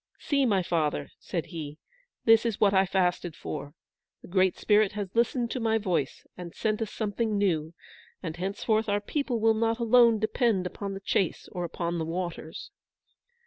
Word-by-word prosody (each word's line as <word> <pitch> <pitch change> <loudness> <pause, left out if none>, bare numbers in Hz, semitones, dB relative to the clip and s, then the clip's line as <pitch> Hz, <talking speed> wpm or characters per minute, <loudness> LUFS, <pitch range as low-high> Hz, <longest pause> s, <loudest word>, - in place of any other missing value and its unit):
"See, 280 -3 +1
my 195 -4 +2
father," 160 -4 -1
said 170 -4 -3
he, 155 -4 -7 0.5
"this 225 0 +6
is 230 -4 -2
what 200 -1 +4
I 190 0 +4
fasted 180 -3 0
for. 145 -1 -6 0.5
The - - -11
Great 185 0 +2
Spirit 210 -1 +3
has 200 -2 -5
listened 235 +1 +1
to 255 - -2
my 225 -1 +2
voice, 180 -10 -2
and 175 -2 -9
sent 215 0 -1
us 220 - -2
something 215 0 -1
new, 165 -5 0 0.5
and 165 -3 -4
henceforth 215 +4 -1
our 205 0 +2
people 250 +2 -2
will 225 0 +4
not 225 +1 +1
alone 235 -1 +5
depend 220 -2 +1
upon 195 +2 -5
the 195 - -7
chase 190 -3 -1
or 175 -2 -3
upon 170 0 -3
the 160 - -2
waters." 170 -1 -5
200 Hz, 175 wpm, -28 LUFS, 175-225 Hz, 0.5 s, this